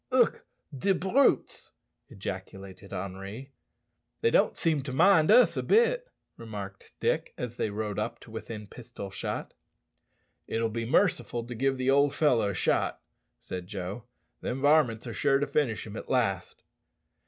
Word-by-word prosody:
"Ugh! 255 -2 +3 0.4
de 190 +9 +2
brutes," 195 +11 +1 0.4
ejaculated 95 -3 -8
Henri. 100 +8 -6 0.7
"They 460 - +3
don't - - +3
seem 160 -4 +1
to 135 0 -6
mind 160 +4 +5
us 245 +4 +6
a - - 0
bit," - - +3 0.3
remarked 100 -4 -8
Dick, - - 0
as 120 -1 -5
they - - 0
rode 105 0 -3
up 105 - -3
to 115 - -14
within 110 -1 -7
pistol 110 -2 -9
shot. - - -4 0.9
"It'll 115 0 0
be 115 +1 -3
merciful 120 - +1
to 120 - -6
give 135 +3 0
the 130 +1 +2
old 140 +1 +3
fellow 125 -9 +3
a 100 - -3
shot," - - +1 0.4
said 90 -1 -6
Joe. 100 +3 -6 0.4
"Them 125 - -3
varmints 140 -6 +3
are 120 - -5
sure 135 +2 +3
to 145 - 0
finish 140 -5 0
him 105 -1 -8
at - - -7
last." 100 -8 -1
120 Hz, 155 wpm, -28 LUFS, 105-145 Hz, 0.9 s, us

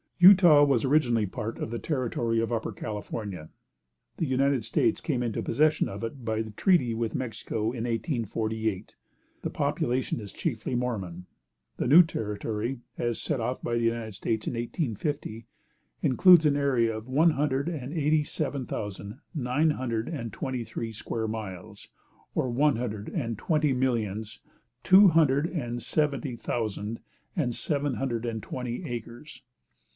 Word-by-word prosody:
Utah 175 -5 +8
was 135 -5 +3
originally 125 -6 +3
part 105 +3 -5
of - - -4
the 120 - -3
territory 120 -5 -1
of 115 +1 -1
Upper 115 -2 -1
California. 105 -6 -6 0.7
The 165 - 0
United 135 -1 +2
States 115 - +1
came 135 -6 -1
into 115 -3 -2
possession 155 +5 +2
of 100 +3 -7
it 120 +3 -5
by 110 -1 0
treaty 120 - +2
with 115 -1 -2
Mexico 110 -3 -3
in 120 -2 -4
1848. 110 - -2 0.5
The - - -1
population 125 0 -1
is 105 -3 -8
chiefly 125 -5 -2
Mormon. 95 -8 -3 0.5
The - - -1
new 155 +7 +9
territory, 110 - -3 0.2
as 120 -1 -1
set 150 -5 -1
off 125 +3 -2
by 120 - -1
the 115 - 0
United 115 -2 -1
States 110 +3 -2
in - - -1
1850, 120 - -3 0.6
includes 170 +5 +6
an 145 - +2
area 125 -6 +2
of 110 +2 -7
one 155 +6 +4
hundred 140 0 0
and 145 -4 -5
eighty 155 -1 +2
seven 145 -3 -3
thousand, 105 +2 -6 0.2
nine 145 +3 +2
hundred 120 -5 -2
and 120 - -5
twenty 130 -2 -3
three 115 0 -5
square 110 +1 -3
miles, 105 -2 -7 0.5
or 130 - +1
one 140 +3 +3
hundred 110 -3 -4
and 115 - -3
twenty 150 -3 +2
millions, 110 -5 -1 0.4
two 195 +1 +8
hundred 150 -2 +3
and 120 -9 -4
seventy 140 0 -1
thousand 110 -2 -3 0.4
and 135 -10 0
seven 145 -3 -1
hundred 120 0 -2
and 115 -2 -3
twenty 125 0 -5
acres. 120 +4 -7
120 Hz, 150 wpm, -28 LUFS, 110-140 Hz, 0.7 s, new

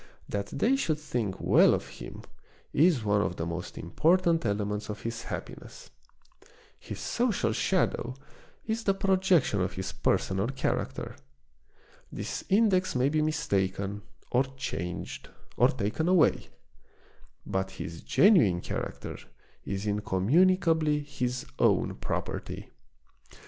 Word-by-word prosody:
That 100 -1 -3
they 235 - +1
should 160 - 0
think 120 -10 -3
well - - +5
of - - -5
him - - -10 0.5
is 155 -5 +4
one 105 0 +3
of 85 -1 -1
the 80 - -3
most 85 +1 -5
important 165 - +2
elements 105 +1 -2
of 105 0 -6
his 115 0 -4
happiness. - - -8 0.9
His - - -8
social 235 -3 0
shadow 130 -9 0 0.5
is 225 +1 -2
the 195 -2 +2
projection 185 - +2
of 90 +2 -1
his 95 0 -4
personal 95 +3 0
character. 135 +1 -2 1.0
This - - -4
index 190 -4 +3
may 130 +2 +3
be 155 +1 +1
mistaken, 100 -8 -1 0.3
or 125 +2 +3
changed, 90 -8 -5 0.3
or 125 - +5
taken 130 +4 -1
away; 180 -3 +3 1.0
but 95 0 -1
his 85 -3 -7
genuine 130 - +5
character - - -5 0.5
is 100 +1 -3
incommunicably 150 - +2
his 125 -3 -3
own - - +3
property. - - -4
125 Hz, 120 wpm, -29 LUFS, -, 1.0 s, well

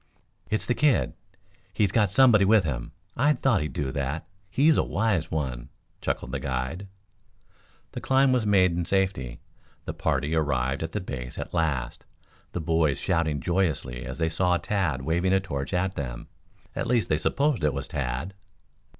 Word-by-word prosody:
"It's 110 - 0
the 125 - +1
kid. 145 -1 +2 0.6
He's 100 -4 +2
got 105 -3 +3
somebody 110 -1 +6
with 105 0 +5
him. 65 -7 -3 0.2
I 145 +5 +4
thought 120 - +2
he'd 75 - -4
do 65 -2 -2
that. 70 +3 -3 0.2
He's 150 +8 +4
a - - +3
wise 95 -6 0
one," 65 -6 -3 0.3
chuckled - - -2
the - - -2
guide. 65 +8 -3 1.0
The - - -6
climb 135 0 +3
was 125 -3 +2
made 95 -4 +4
in 85 +1 -1
safety. 95 -9 -1 0.4
The - - -4
party 75 0 0
ar 80 - +3
rived 65 -2 -1
at 80 0 -4
the 105 - -2
base 65 -7 -6
at - - -6
last, 75 -8 -1 0.5
the - - -3
boys 80 -3 +1
shouting 80 -5 0
joyously 80 -8 -1
as - - -6
they 80 -1 +1
saw 90 +2 +2
Tad 85 -10 -1
waving 85 +5 +1
a 95 - +5
torch 70 -8 -4
at 95 0 0
them. - - -6 0.5
At - - -2
least 120 -2 +2
they 75 - +2
supposed 140 - +1
it 75 - +3
was - - -4
Tad. 70 +8 -3
85 Hz, 175 wpm, -26 LUFS, 70-100 Hz, 1.0 s, somebody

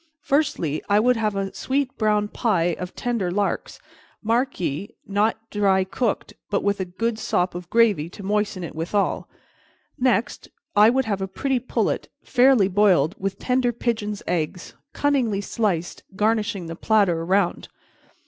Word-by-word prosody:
"Firstly, 270 - 0
I 205 +1 +5
would 250 +3 +3
have 215 -2 0
a 195 -1 -2
sweet 270 0 -1
brown 210 -1 +1
pie 175 -6 +1
of 180 0 -6
tender 235 -7 -1
larks; 200 +3 -2 0.5
mark 240 +5 0
ye, 180 +6 -3
not 205 +3 +1
dry 195 -2 +3
cooked, 215 +4 -2 0.2
but 200 - 0
with 200 0 +1
a 190 - -1
good 220 +5 -2
sop 180 -3 0
of 175 0 -8
gravy 210 -9 +3
to 200 - -11
moisten 205 -2 -1
it 170 - -6
withal. 175 +6 -1 0.7
Next, 245 -2 0 0.3
I 210 +2 +7
would 265 +2 +1
have 200 -3 -2
a 190 - -1
pretty 260 +7 -1
pullet, 250 - -1
fairly 250 -5 +4
boiled, 185 -5 +3
with 195 0 -3
tender 250 0 +1
pigeons' 215 -3 -2
eggs, 170 +1 -3 0.2
cunningly 260 -8 +1
sliced, 200 -5 -2
garnishing 210 -2 0
the 165 0 -6
platter 195 -4 +2
around. 185 +1 0
205 Hz, 150 wpm, -23 LUFS, 185-230 Hz, 0.7 s, I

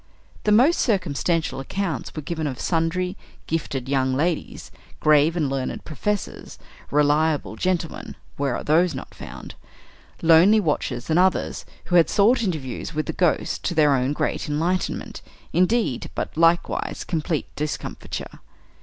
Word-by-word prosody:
The 210 - +3
most 255 +11 +5
circumstantial 170 - 0
accounts 185 +5 -3
were 155 - -5
given 160 0 -3
of 130 -4 -5
sundry 180 +2 0 0.3
"gifted 140 -5 -3
young 130 -1 +1
ladies," 160 +4 -2 0.3
"grave 155 +2 +4
and 155 -4 +1
learned 135 -1 -3
professors," 200 +7 -4 0.3
"reliable 150 -3 +2
gentlemen" 175 +5 -2 0.2
where 140 -3 -1
are - - -4
those 165 +4 +3
not - - -8
found? - - -9 0.7
"lonely 170 +7 +6
watchers," 145 - -2
and 160 - +4
others, 185 0 +1 0.2
who 175 - +3
had 165 - +5
sought 225 +5 +4
interviews 155 - -3
with 155 - -1
the - - -3
"ghost," 175 -3 0
to 175 - -1
their 150 -2 +5
own 130 +1 +1
great 150 - -2
enlightenment, 170 +5 -2 0.3
indeed, 185 - +1
but, - - -4
likewise, 165 +1 +1
complete 160 -2 -2
discomfiture. 150 0 -5
160 Hz, 135 wpm, -23 LUFS, 145-180 Hz, 0.7 s, lonely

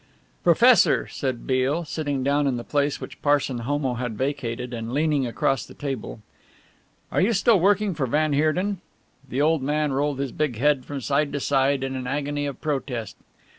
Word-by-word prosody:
"Professor," - - +5
said 130 -3 -4
Beale, 135 +6 0
sitting 145 -4 -2
down 140 +1 +2
in 130 -3 0
the 120 - -5
place 145 +1 0
which - - -9
Parson 145 -4 +1
Homo 135 +2 -1
had 120 -3 -4
vacated 125 -2 -3
and 115 0 -5
leaning 145 -2 +1
across 135 +3 0
the - - -13
table, 135 -6 -5 0.9
"are - - +1
you 215 +5 +3
still 215 +1 +4
working 200 +2 +2
for 140 -5 -2
van 150 +4 +1
Heerden?" 175 +7 +1 0.5
The 135 +4 0
old 160 -1 +2
man 150 +1 0
rolled 145 +1 0
his 135 -2 -3
big 150 -5 -1
head 140 0 +2
from 140 -2 -5
side 140 +3 0
to 145 - -1
side 135 0 +1
in 135 0 -3
an 130 -1 -4
agony 145 +1 -2
of 140 - -6
protest. 135 -7 -3
140 Hz, 180 wpm, -24 LUFS, 130-150 Hz, 0.9 s, Professor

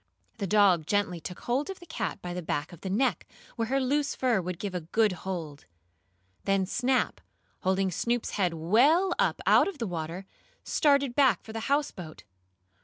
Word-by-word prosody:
The 200 - -2
dog 190 -6 +4
gently 200 -4 0
took 180 +2 -8
hold 265 +7 -1
of 385 - -6
the 350 - -13
cat 210 - -4
by 175 0 -4
the 180 - -4
back 155 +1 -3
of 170 - -13
the 190 - -4
neck, 220 -1 0 0.3
where 230 -2 -1
her 270 +3 +1
loose 280 +2 0
fur 245 -7 +1
would 180 0 -4
give 200 +1 -5
a 180 - -2
good 210 +6 +2
hold. 170 -5 -6 0.8
Then 195 -1 +2
Snap, 250 +6 0 0.4
holding 190 0 +1
Snoop's 235 +6 -1
head 180 -4 0
well 275 - +3
up - - +1
out - - +5
of 395 -5 -5
the 235 - -3
water, 170 0 -5 0.4
started 280 -4 +2
back 270 -2 +3
for 220 - -10
the 225 0 -4
houseboat. 225 - -2
205 Hz, 180 wpm, -28 LUFS, 180-260 Hz, 0.8 s, out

